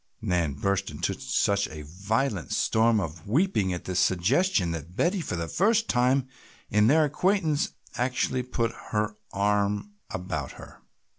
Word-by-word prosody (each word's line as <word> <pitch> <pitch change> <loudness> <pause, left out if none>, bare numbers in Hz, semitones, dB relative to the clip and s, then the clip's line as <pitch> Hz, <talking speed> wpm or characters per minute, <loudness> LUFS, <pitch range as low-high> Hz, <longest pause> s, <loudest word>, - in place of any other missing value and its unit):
Nan 85 -6 0
burst 100 +6 0
into - - -2
such 100 +9 0
a 75 0 -8
violent 100 - -2
storm 110 0 +3
of 80 -2 -5
weeping 130 - +2
at 90 - -4
this 90 -1 -1
suggestion 95 - +2
that 85 +2 -6
Betty 180 - +1
for 140 - -3
the 85 -1 -3
first 220 - +2
time 130 +1 +2 0.4
in 105 +1 +4
their 155 +4 +5
acquaintance 180 +2 +1 0.2
actually 125 +1 0
put 115 -2 -1 0.2
her 105 0 -1 0.2
arm 105 - 0 0.2
about 85 -7 -4
her. - - -13
105 Hz, 145 wpm, -27 LUFS, 90-140 Hz, 0.4 s, their